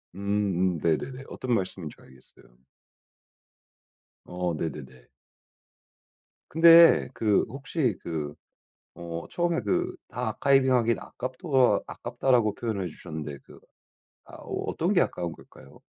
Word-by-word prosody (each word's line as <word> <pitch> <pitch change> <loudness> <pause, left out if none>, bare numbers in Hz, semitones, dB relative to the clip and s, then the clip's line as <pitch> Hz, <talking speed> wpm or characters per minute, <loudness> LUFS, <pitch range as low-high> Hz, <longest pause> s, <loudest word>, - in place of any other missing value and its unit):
음음. 100 -3 0
네네네. 125 - -1
어떤 125 -2 -3
말씀인지 95 -6 -3
알겠어요. 65 -1 -20 1.8
어 90 -1 -3
네네네. 65 -6 -7 1.4
근데 165 +1 +7
그 105 -4 +2
혹시 135 - -2
그 75 -3 -4 0.6
어 85 -1 -6
처음에 175 -1 0
그 365 0 -1
"다 125 -1 -4
아카이빙하긴 130 -2 +2
아깝또 130 - 0
아깝다."라고 120 -3 0
표현해 105 -5 -3
주셨는데 75 -3 -7
그 - - -15 0.7
아 - - -16
어 - - -5
어떤 - - -1
게 - - +4
아까운 85 -2 -2
걸까요? - - -16
105 Hz, 240 characters per minute, -27 LUFS, 85-130 Hz, 1.8 s, 근데